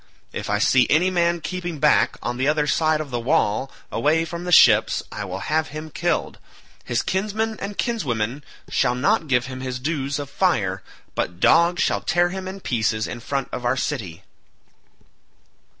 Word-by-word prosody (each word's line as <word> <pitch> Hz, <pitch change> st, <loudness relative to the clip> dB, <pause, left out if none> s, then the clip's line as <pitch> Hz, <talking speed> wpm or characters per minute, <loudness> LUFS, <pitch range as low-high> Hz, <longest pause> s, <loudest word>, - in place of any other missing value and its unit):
If -, -, -5 dB
I 105 Hz, -, +2 dB
see 125 Hz, +4 st, +4 dB
any 180 Hz, +5 st, +3 dB
man 170 Hz, -1 st, +1 dB
keeping 175 Hz, -1 st, -4 dB
back -, -, +3 dB
on 120 Hz, +2 st, -2 dB
the 130 Hz, +2 st, 0 dB
other 150 Hz, 0 st, +2 dB
side 155 Hz, 0 st, +1 dB
the 120 Hz, -, -1 dB
wall 130 Hz, -2 st, +1 dB, 0.2 s
away 160 Hz, +3 st, +2 dB
from 170 Hz, +1 st, -6 dB
the 180 Hz, -, -3 dB
ships 110 Hz, -8 st, +6 dB
I 100 Hz, -, -5 dB
will 95 Hz, 0 st, -5 dB
have 155 Hz, +1 st, 0 dB
him 155 Hz, +1 st, -8 dB
killed: -, -, -1 dB, 0.4 s
his 120 Hz, -, -1 dB
kinsmen 215 Hz, +3 st, -1 dB
and 200 Hz, 0 st, -6 dB
kinswomen 135 Hz, -, -2 dB, 0.2 s
shall 125 Hz, -, +1 dB
not 165 Hz, -, +1 dB
give 125 Hz, -3 st, +2 dB
him 130 Hz, 0 st, -7 dB
his 130 Hz, -1 st, -3 dB
dues 140 Hz, 0 st, -2 dB
of 145 Hz, -1 st, -5 dB
fire, 105 Hz, -, 0 dB, 0.3 s
but 90 Hz, -1 st, -3 dB
dogs 170 Hz, -, +4 dB
shall -, -, 0 dB
tear 175 Hz, 0 st, +2 dB
him 190 Hz, +1 st, -5 dB
in 190 Hz, +1 st, -7 dB
pieces 110 Hz, -5 st, 0 dB
in 120 Hz, -, -6 dB
front 135 Hz, +3 st, -3 dB
of 125 Hz, -, -5 dB
our 120 Hz, +2 st, +1 dB
city." 100 Hz, -, -4 dB
145 Hz, 175 wpm, -22 LUFS, 120-175 Hz, 0.4 s, ships